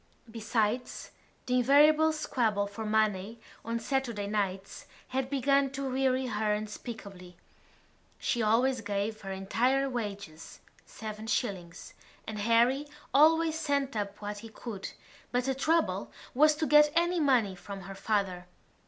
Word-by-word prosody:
Besides, 225 +1 -2 0.3
the 250 0 +1
invariable 300 +5 +5
squabble 230 -9 0
for 200 +2 -7
money 215 0 0 0.2
on 230 +1 -2
Saturday 235 -4 -2
nights 195 -2 -3 0.2
had 260 0 -2
begun 275 0 +2
to 275 0 -3
weary 260 0 +1
her 210 -3 0
unspeakably. 205 -4 -8 0.8
She 240 - -1
always 235 +3 +2
gave 205 +1 -3
her 195 -1 -6
entire 245 +8 +1
wages—seven 210 0 -7
shillings—and 200 0 -5
Harry 235 +6 +3 0.3
always 320 +2 +4
sent 280 -4 -1
up 200 -1 -3
what 205 0 -4
he 225 +1 -10
could 215 -3 -7 0.4
but 245 0 +1
the 265 +1 0
trouble 320 +5 0 0.2
was 305 +3 +5
to 315 - -1
get 300 0 +6
any 345 +1 +2
money 250 -10 +3
from 195 +2 -8
her 195 +1 -8
father. 195 -3 -2
230 Hz, 125 wpm, -30 LUFS, 205-270 Hz, 0.8 s, get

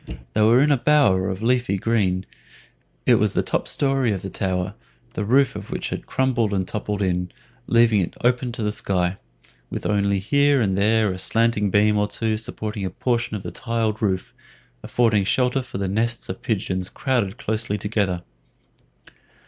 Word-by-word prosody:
They - - +1
were 115 +4 +5
in 150 - +3
a 140 - +4
bower 115 -11 +3
of 95 +3 -4
leafy 120 -4 +1
green. 95 -3 0 0.8
It - - +5
was - - +2
the - - +1
top - - -1
story 135 -4 +1
of 95 - -3
the 95 - -5
tower, 90 -1 -2 0.4
the - - -2
roof 130 +5 +3
of 105 0 -7
which - - -3
had - - -5
crumbled 120 -5 0
and 95 -1 -1
toppled 105 -1 -3
in, 90 -1 -1 0.4
leaving 115 -3 +4
it 85 - -4
open 125 0 +1
to 115 - -4
the 105 - 0
sky, 95 -3 -1 0.5
with - - -5
only 100 -1 +1
here 140 +8 +3
and 100 -5 +1
there 110 +1 +2
a 90 - -7
slanting 115 0 +2
beam 105 +2 +3
or 105 - +1
two 110 +1 -1
supporting 105 -1 -5
a 95 - -1
portion 120 +4 -1
of 100 - -5
the - - -5
tiled 115 -3 -2
roof, 95 -3 -1 0.5
affording 110 -4 +2
shelter 125 +6 +1
for 130 -4 -7
the 100 0 -2
nests 115 +4 -1
of - - -4
the - - -32
pigeons 95 -4 -2
crowded 120 -6 -1
closely 110 -4 -2
together. 100 -5 -1
105 Hz, 180 wpm, -23 LUFS, 95-120 Hz, 0.8 s, were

